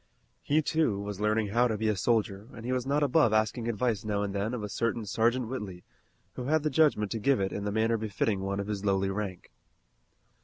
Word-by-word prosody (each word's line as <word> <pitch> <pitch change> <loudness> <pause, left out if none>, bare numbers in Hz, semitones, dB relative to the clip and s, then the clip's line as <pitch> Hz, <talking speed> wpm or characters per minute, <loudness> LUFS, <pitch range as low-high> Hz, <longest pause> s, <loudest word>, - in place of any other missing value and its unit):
He, 155 +2 +2
too, 150 -11 +1
was 100 -1 -5
learning 105 0 +1
how 120 +4 +3
to 110 -2 -2
be 110 +1 -1
a 105 - +2
soldier 105 0 0
and 115 - -9
he 125 - -2
was 130 0 -1
not 145 +2 +2
above 140 -4 +3
asking 110 +2 +1
advice 115 -2 0
now 105 -1 -1
and 100 -1 -3
then 100 +4 -1
of 115 - -5
a - - -2
certain 115 +2 -1
Sergeant 115 +4 +1
Whitley 105 -8 -6 0.5
who 125 - -6
had 155 +2 +2
the 155 - 0
judgment 135 -9 +3
to 115 - -2
give 135 +4 +2
it 95 0 -1
in 100 - -4
the 105 - -1
manner 110 +2 +2
befitting 105 -1 -1
one 100 +1 -2
of 100 - -2
his 105 -1 -4
lowly 95 -1 +1
rank. 95 -3 -5
110 Hz, 230 wpm, -29 LUFS, 100-125 Hz, 0.5 s, how